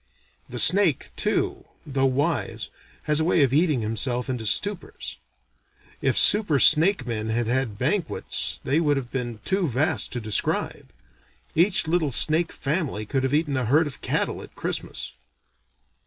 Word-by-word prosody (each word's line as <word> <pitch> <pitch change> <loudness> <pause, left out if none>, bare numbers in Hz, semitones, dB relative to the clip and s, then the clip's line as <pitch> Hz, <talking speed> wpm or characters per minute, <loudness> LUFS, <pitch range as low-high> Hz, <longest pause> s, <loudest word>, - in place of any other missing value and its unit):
The 125 - -6
snake 180 +1 +4
too, - - -2 0.2
though 135 -2 0
wise, 135 -4 -2 0.3
has 150 0 +1
a - - +1
way 165 -2 +2
of 135 -1 0
eating 150 -4 +2
himself 120 +4 -1
into 115 -4 -4
stupors. 195 - -1 0.8
If - - 0
super 205 -8 +5
snake 155 - +5
men 110 -2 -4
had 115 +1 -1
had 120 -3 -2
banquets 160 - -3
they 145 +4 0
would 145 -3 +1
have 125 -3 -6
been 120 -4 -5
too 190 -2 0
vast 145 +6 0
to 125 - -3
describe. 110 -3 -2 0.6
Each 180 +3 +2
little 160 -3 0
snake 160 +6 +3
family 140 - -3
could 135 +5 -2
have 130 +1 -2
eaten 150 -2 -1
a 130 -2 -1
herd 150 +8 +2
of 145 -3 -8
cattle - - -2
at - - -14
Christmas. - - -5
140 Hz, 155 wpm, -24 LUFS, 120-160 Hz, 0.8 s, super